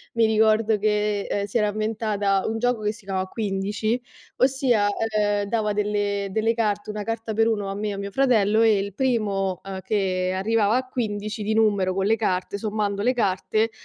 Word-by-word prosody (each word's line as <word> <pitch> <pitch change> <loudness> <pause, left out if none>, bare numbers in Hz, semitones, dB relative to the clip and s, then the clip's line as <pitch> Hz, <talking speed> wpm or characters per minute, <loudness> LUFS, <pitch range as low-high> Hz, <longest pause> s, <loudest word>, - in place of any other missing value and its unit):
mi 230 - +4
ricordo 220 0 +3
che, 210 0 +1
ehm, 200 0 -2
si 205 +4 -2
era 210 -1 +2
inventata 210 -2 0
un 225 0 -2
gioco 245 -2 0
che 210 0 0
si 215 -3 -16
chiamava 190 -1 -2
15, 210 +3 -2 0.4
ossia, 255 -5 +2 0.3
ehm, 205 -1 +1
dava 215 -3 0
delle 205 -1 -1
delle 220 +3 +1
carte, 210 -2 -1
una 210 -1 -4
carta 225 0 -3
per 225 +1 +3
uno 205 -3 -1
a 195 - -4
me 210 +1 -2
e 205 - -3
a - - -6
mio 200 0 -5
fratello 220 -4 +3
e 220 -2 +5
il 200 -1 -4
primo, 205 -7 0
ehm, 190 -1 -6
che 185 -2 0
arrivava 215 +2 +2
a 255 0 -3
15 215 -3 -3
di 215 +1 0
numero 200 -4 +2
con 195 0 0
le 220 +2 +3
carte, 190 -1 -1
sommando 205 -2 -2
le 250 +4 +2
carte, 220 +1 0
210 Hz, 195 wpm, -24 LUFS, 200-225 Hz, 0.4 s, e